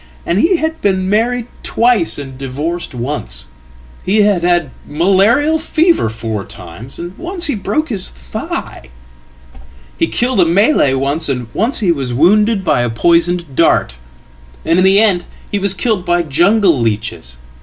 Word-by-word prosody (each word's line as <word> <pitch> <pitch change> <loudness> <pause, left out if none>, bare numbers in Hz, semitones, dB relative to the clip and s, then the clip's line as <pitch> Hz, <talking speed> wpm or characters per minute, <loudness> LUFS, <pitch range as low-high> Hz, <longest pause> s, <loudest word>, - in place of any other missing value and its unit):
And 175 +3 0
he 355 - +3
had 320 0 -2
been 190 -1 0
married 235 +3 +1 0.2
twice 230 -7 +1
and 135 -2 -8
divorced 140 +4 -4
once; 65 - -3 0.6
hehad 205 -2 +2
had 175 -5 +1 0.2
malarial 200 - +2
fever 325 - +2
four 110 -2 -4
times, 110 +12 -10
and 175 +2 -7
once 350 0 -3
he 290 - 0
broke 215 +9 -2
his 200 -6 -1
thigh. 65 0 -7 1.1
He - - +2
killeda 240 -7 +1
Malay 190 - +3
once, 140 +4 -1
and 125 -4 -3
once 230 +4 -1
he 185 -5 +3
was 135 -6 -2
wounded 205 - +3
by 145 -7 +2
a 120 - 0
poisoned 170 +4 +1
dart. - - +2 0.7
And 170 - +2
in - - +3
the 190 +1 +5
endhe 200 -1 0
was 195 -1 +1
killed 205 -1 -1
by 175 -1 +1
jungle 175 - +3
leeches. 105 - -3
175 Hz, 145 wpm, -15 LUFS, 135-215 Hz, 1.1 s, the